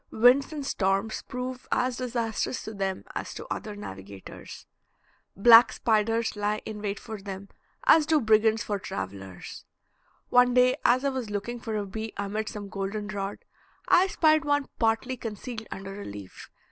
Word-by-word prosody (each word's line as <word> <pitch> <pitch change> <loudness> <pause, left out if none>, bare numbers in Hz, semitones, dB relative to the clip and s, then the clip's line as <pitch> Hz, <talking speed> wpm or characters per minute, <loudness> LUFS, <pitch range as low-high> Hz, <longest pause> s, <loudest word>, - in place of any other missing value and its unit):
Winds 250 +6 +5
and 295 -3 -5
storms 195 -1 0
prove 250 0 -5
as 250 -1 +1
disastrous 235 -1 -2
to 220 - -6
them 195 -2 -3
as - - -5
to - - -7
other 210 -1 -4
navigators. 95 - -10 0.7
Black 230 +3 +8
spiders 225 0 +1
lie 210 +1 -1
in 215 -1 -6
wait 205 -1 -3
for 220 -3 -8
them 195 0 -7 0.3
as 320 -11 +6
do 315 -1 +4
brigands 220 -2 +3
for 205 -1 -2
travelers. 95 - -7 0.7
One 245 0 +5
day 250 +1 +5
as 255 +3 +3
I - - +3
was 260 -5 -4
looking 210 +4 -4
for 225 -2 -4
a 205 - -2
bee 220 +3 -5
amid 210 +2 -2
some 205 -1 -7
golden 200 +1 -4
rod, 200 -1 -5 0.4
I 370 +2 +6
spied 310 -4 +3
one 290 -1 +1
partly 230 +3 +1
concealed 220 0 -6
under 195 +1 -7
a - - -7
leaf. 100 -2 -9
220 Hz, 160 wpm, -27 LUFS, 200-250 Hz, 0.7 s, Black